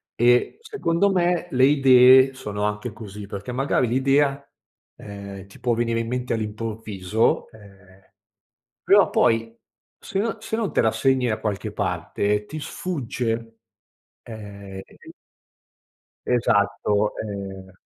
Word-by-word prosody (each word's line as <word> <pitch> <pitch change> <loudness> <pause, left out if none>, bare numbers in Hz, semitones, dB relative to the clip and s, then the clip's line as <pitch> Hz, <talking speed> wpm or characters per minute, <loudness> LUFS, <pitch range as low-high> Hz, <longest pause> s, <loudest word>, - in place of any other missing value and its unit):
E, 120 - +3
secondo 200 - 0
me, 175 -1 +1
le 130 0 +2
idee 130 -1 +6
sono 105 -5 -5
anche 105 +3 -2
così, 105 -1 -9
perché 100 +4 -6
magari 130 -1 +1
l'idea, 135 +3 +1 0.5
ehm, 100 -1 -9
ti 100 - -16
può 120 -1 0
venire 115 0 0
in 115 - -5
mente 125 0 -2
all'improvviso, 110 -2 -2
ehm, 100 -3 -18 0.8
però - - +5
poi 115 0 +2 0.5
se - - -5
no 225 +2 -1
se 220 0 -3
non 225 -4 -2
te - - +4
la 110 -1 +2
segni 130 -2 +1
da 110 - -1
qualche 105 -3 -3
parte 105 +1 -1
ti 155 +5 -7
sfugge. 115 -8 -4 0.7
Ehm, 100 -3 -9
e - - -20
qui - - -14 1.2
Esatto, 105 -3 +1
ehm 95 -2 -7
115 Hz, 130 wpm, -23 LUFS, 105-130 Hz, 1.2 s, idee